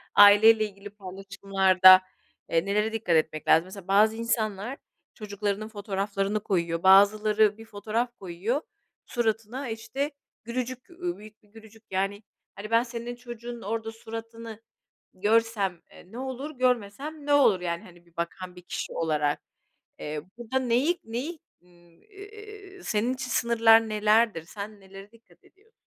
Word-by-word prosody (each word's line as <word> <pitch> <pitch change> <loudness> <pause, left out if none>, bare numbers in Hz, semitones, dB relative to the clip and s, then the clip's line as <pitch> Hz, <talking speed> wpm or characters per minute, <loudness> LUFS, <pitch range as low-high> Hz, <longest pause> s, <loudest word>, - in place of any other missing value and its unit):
aile 205 +2 +8
ile 220 -1 +4
ilgili 200 0 -10
paylaşımlarda, 195 -1 +4 0.5
eee, 165 +2 +1
nelere 210 +2 0
dikkat 215 -7 0
etmek 155 -1 0
lazım? 165 +2 +5
Mesela 190 0 -11
bazı 210 +3 +4
insanlar 230 +1 -2 0.4
çocuklarının 210 0 -4
fotoğraflarını 200 -1 -2
koyuyor, 170 -3 -1
bazıları 210 +2 +5
bir 225 - -12
fotoğraf 225 +3 -3
koyuyor, 195 - -3 0.4
suratına, 230 +2 -2
işte, 270 +6 -4 0.3
gülücük, 250 +2 -5
uuu, 350 0 -5
büyük 215 +1 -15
bir 210 - -26
gülücük. 220 0 -16
Yani, 195 +2 -2 0.3
hani, 205 +2 -8
ben 230 +1 +4
senin 240 0 -6
çocuğunun 240 -1 -9
orada 225 +2 -4
suratını 225 0 -9 0.5
görsem, 205 -2 +1
eee, 180 - -17
ne 235 - -8
olur, 265 +3 -6
görmesem 255 +5 -1
ne 290 - +2
olur? 265 -10 +5
Yani, 170 +1 -3
hani, 175 -4 -17
bir 170 -1 -27
bakan 180 +2 -5
bir 180 - -12
kişi - - -5
olarak, 150 -3 0 0.6
eee, 150 0 -5 0.2
burada 240 +2 -2
neyi 260 +7 +1
neyi, 260 +9 -5 0.2
ııı, 180 - -25 0.4
iii, 415 -1 -12
senin 230 +4 0
için 260 0 -6
sınırlar 225 -2 +4
nelerdir, 215 -4 +2
sen 205 +3 -9
nelere 195 +1 -13
dikkat 230 0 -24
ediyorsun? 425 +4 -27
215 Hz, 140 wpm, -27 LUFS, 195-235 Hz, 0.6 s, aile